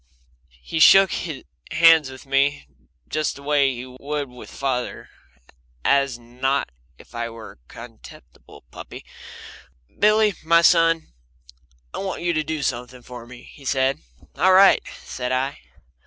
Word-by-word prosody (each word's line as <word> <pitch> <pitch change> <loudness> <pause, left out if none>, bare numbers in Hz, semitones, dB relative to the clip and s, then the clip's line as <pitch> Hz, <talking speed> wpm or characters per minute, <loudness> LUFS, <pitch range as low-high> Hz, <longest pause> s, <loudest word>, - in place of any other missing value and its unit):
He 160 - -4
shook 195 +4 +7 0.6
hands 165 -4 +5
with 130 +2 -12
me 135 - 0 0.4
just 155 0 -2
the 140 - -13
way 140 -2 +2
he 120 +1 -7
would 140 +2 -5
with 125 0 -13
father, 130 -3 -4 0.7
and 125 -3 -1
not 135 - 0 0.3
as - - -17
if - - -24
I 120 0 -4
were 115 -1 -11
a - - -20
contemptible 115 - -14
puppy. - - -11 0.9
"Billy, 215 0 +4
my 170 +1 +4
son, 165 - +3 0.8
I - - -5
want 190 -3 -5
you 175 -1 0
to 155 -1 0
do 155 -1 -4
something 125 0 -4
for 120 -1 -11
me," 120 0 -13
he 140 - -16
said. 135 0 0 0.4
"All 185 +1 +4
right," 195 +1 +6 0.2
said 125 0 -5
I. 130 +2 -2
140 Hz, 140 wpm, -22 LUFS, 125-160 Hz, 0.9 s, shook